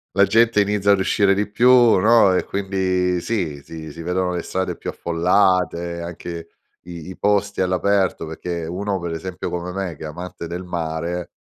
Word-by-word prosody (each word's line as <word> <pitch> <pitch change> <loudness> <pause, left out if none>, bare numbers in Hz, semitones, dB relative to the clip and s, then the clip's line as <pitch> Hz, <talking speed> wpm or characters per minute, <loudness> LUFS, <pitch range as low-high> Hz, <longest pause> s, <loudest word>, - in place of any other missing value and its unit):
la 100 - +5
gente 110 +2 +4
inizia 100 0 +2
ad 100 - +4
uscire 100 +1 +3
di 105 +1 -1
più, 120 +4 +4 0.3
no, 105 0 +5
e 90 - 0
quindi, 95 -2 0
sì, 85 -8 -3
si 80 +1 -9
si 85 - -9
vedono 90 +1 -1
le 90 - -2
strade 95 +2 -3
più - - -6
affollate, 85 0 +1
anche 85 0 -7 0.4
i 85 -1 -9
i 95 - -9
posti 100 0 0
all'aperto 95 -1 +1
perché, 85 +1 -5
uno 95 +3 -3
per 85 -1 -4
esempio 90 +3 -5
come 90 +1 -4
me 95 -3 -4
che - - -10
è - - -4
amante 85 +2 -7
del 90 +2 -5
mare, 85 0 -4
90 Hz, 180 wpm, -21 LUFS, 85-100 Hz, 0.4 s, la